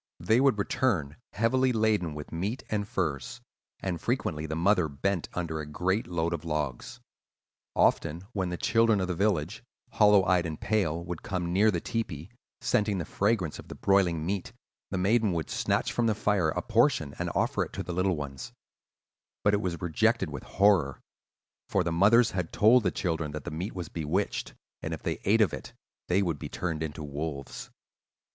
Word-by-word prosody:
They 110 +8 +3
would 135 -5 +4
return 100 - 0 0.2
heavily 130 +4 +2
laden 110 -8 +1
with 75 -1 -8
meat 100 +10 -3
and 105 -1 -1
furs; 75 -10 -2 0.4
and 90 -4 -3
frequently 75 +1 -1
the 80 - -3
mother 90 0 +3
bent 85 +6 -2
under 80 -3 -2
a 75 - -4
great 95 +8 -1
load 85 -1 -1
of 85 - -4
logs. 75 -6 -3 0.8
Often 85 +4 +2
when 95 -3 -1
the 90 - -3
children 115 0 +3
of 95 - -1
the 90 - -1
village, 95 -1 0 0.3
hollow 105 -3 +5
eyed 90 -2 +2
and 80 -1 -6
pale, 85 -6 0
would 90 -2 -5
come 90 -3 -3
near 105 +4 +5
the 90 -5 0
tepee, 95 - -4 0.3
scenting 105 -5 +1
the 85 - -3
fragrance 100 -5 0
of - - -10
the - - -8
broiling 90 -5 +2
meat, 95 +1 -3 0.4
the - - -2
maiden 105 +2 +2
would 80 -3 -3
snatch - - 0
from 120 -1 +1
the 110 - +2
fire 100 -6 +1
a 90 +3 -2
portion 115 - +2
and - - -1
offer - - +1
it - - -9
to - - -4
the 90 - -5
little 90 +1 +1
ones; 70 -3 -6 0.9
but 105 - +4
it 105 - +2
was 85 -5 -3
rejected 85 -3 +1
with - - -5
horror; 95 -9 +2 0.7
for 95 - +2
the 85 - -1
mothers 110 +7 +5
had 90 -3 -3
told 120 +4 +5
the 100 - +1
children 80 -5 -2
that 75 -2 -5
the - - -6
meat 90 +8 -4
was 90 -2 -4
bewitched, 80 -2 -2 0.3
and - - -3
if - - -14
they - - -2
ate 110 +3 +4
of 100 - +3
it - - -7 0.3
they 95 +3 +2
would 85 -6 -2
be - - -6
turned 80 -3 -3
into 75 -1 -4
wolves. 70 -1 -5
90 Hz, 190 wpm, -28 LUFS, 80-105 Hz, 0.9 s, hollow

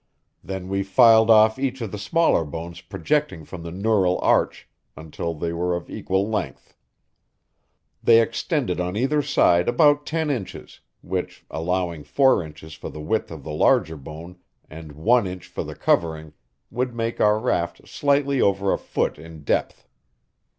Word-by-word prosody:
Then 95 -1 -6
we 100 +1 -1
filed 110 +3 +5
off 110 +2 +5
each 135 -1 -2
of 115 -5 -5
the 105 - -6
smaller 165 - +2
bones 85 +3 -7
projecting 95 - -2
from 90 +1 -9
the 85 - -7
neural 95 0 +1
arch - - +1 0.3
until 80 +1 -5
they 85 +2 -3
were 90 +1 -1
of 85 - -7
equal 95 +2 -1
length. 110 -1 -5 1.3
They 115 -1 +6
extended 115 - -1
on 90 +1 -2
either 140 +5 +1
side 90 -11 +3
about 145 +3 +3
ten 160 -1 -1
inches, 115 -9 -6 0.2
which, 90 0 -5
allowing 85 -1 -2
four 135 - +3
inches 80 -1 -11
for - - -8
the 75 - -10
width 85 +9 -1
of 80 -4 -9
the 75 - -7
larger 80 +1 +2
bone 80 +5 -10 0.3
and 80 -1 -11
one 110 - +2
inch 90 -1 -7
for - - -5
the - - -8
covering, 80 -2 0 0.4
would 125 0 -2
make 115 0 -3
our 105 0 +4
raft 95 -6 -2
slightly 140 -1 +1
over 100 0 +2
a - - -2
foot - - -2
in 80 -1 -12
depth. - - -2
95 Hz, 160 wpm, -23 LUFS, 85-115 Hz, 1.3 s, They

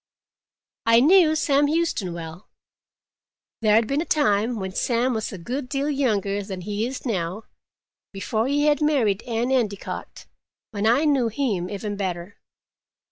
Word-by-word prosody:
I 230 0 +6
knew 315 +3 +5
Sam 290 -2 +2
Huston 310 - -1
well. 170 +2 -9 1.1
There 215 -1 +4
had 225 +1 +4
been 275 +6 -1
a - - -3
time, 225 -6 +1
when 190 -1 -4
Sam 245 +4 0
was 220 -2 -3
a 195 - -7
good 250 +9 -5
deal 280 +2 -1
younger 205 -8 0
than 190 -2 -6
he 210 +4 -2
is 260 +2 -7
now, 190 -2 -2 0.7
before 220 +3 -2
he 290 +2 +1
had 300 0 +2
married 245 -10 +2
Anne 235 +2 -1
Endicott, 215 -7 -3 0.5
when 210 -1 -1
I 250 +7 +3
knew 275 -5 +2
him 215 -7 -2
even 205 0 -4
better. 185 -1 -4
225 Hz, 150 wpm, -23 LUFS, 200-275 Hz, 1.1 s, I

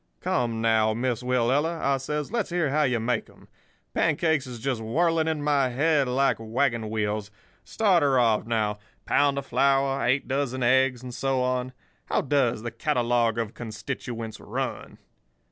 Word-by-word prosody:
'Come, 115 -2 -1
now, 110 -1 +2
Miss 120 0 -1
Willella,' 130 +7 +1
I 140 0 +1
says; 150 +4 -4
'let's 230 -3 -1
hear 170 -5 0
how 155 +2 +2
you 125 -5 +1
make 115 0 -1
'em. - - -19 0.5
Pancakes 160 -3 +1
is 125 -1 -7
just 125 -1 -2
whirling 160 +8 +1
in 155 -2 -1
my 140 -3 +2
head 145 +2 +2
like 135 +2 +2
wagon 115 0 -1
wheels. 105 -1 -2 0.3
Start 195 -6 +2
her 140 -2 +3
off, 115 -3 +2
now—pound 115 +6 0
of 140 - -3
flour, 135 +1 +2
eight 130 +4 +1
dozen 130 -2 -1
eggs, 130 0 +3
and 125 -1 -7
so 135 0 0
on. 125 0 -1 0.3
How - - 0
does 130 -6 +1
the 120 - -4
catalogue 120 -2 +1
of 115 -2 -2
constituents 115 0 -6
run? - - -5
130 Hz, 160 wpm, -26 LUFS, 115-140 Hz, 0.5 s, her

